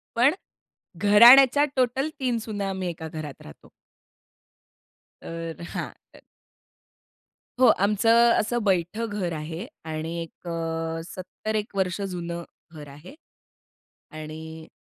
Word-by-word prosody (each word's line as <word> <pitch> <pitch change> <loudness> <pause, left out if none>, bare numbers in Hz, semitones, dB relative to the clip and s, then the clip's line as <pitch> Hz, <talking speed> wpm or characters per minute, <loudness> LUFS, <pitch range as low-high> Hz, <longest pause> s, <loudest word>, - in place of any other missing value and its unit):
पण 250 +5 +4 0.6
घराण्याच्या 240 +8 +7
टोटल 260 +3 +1
3 250 -3 0
सुना 205 -3 -3
आम्ही 185 -2 -3
एका 160 -1 -7
घरात 155 -3 -8
राहतो. 75 - -14 1.5
तरं 165 0 -7
हां. - - -4 0.2
तरं - - -17 1.4
हो. 255 - +6 0.2
आमचं 225 +3 +4
असं 240 +3 -1
बैठ 185 +1 0
घर 195 -5 -3
आहे. 160 +5 -6 0.2
आणि 160 +1 -4
एक 165 +1 -11
अ, 165 -1 -3
सत्तर 185 +4 -6
एक 210 -1 -3
वर्ष 185 -1 -1
जुनं 170 -1 -5 0.3
घर 150 -2 -10
आहे. 150 - -13 1.0
आणि 160 +1 -9
180 Hz, 115 wpm, -25 LUFS, 165-220 Hz, 1.5 s, घराण्याच्या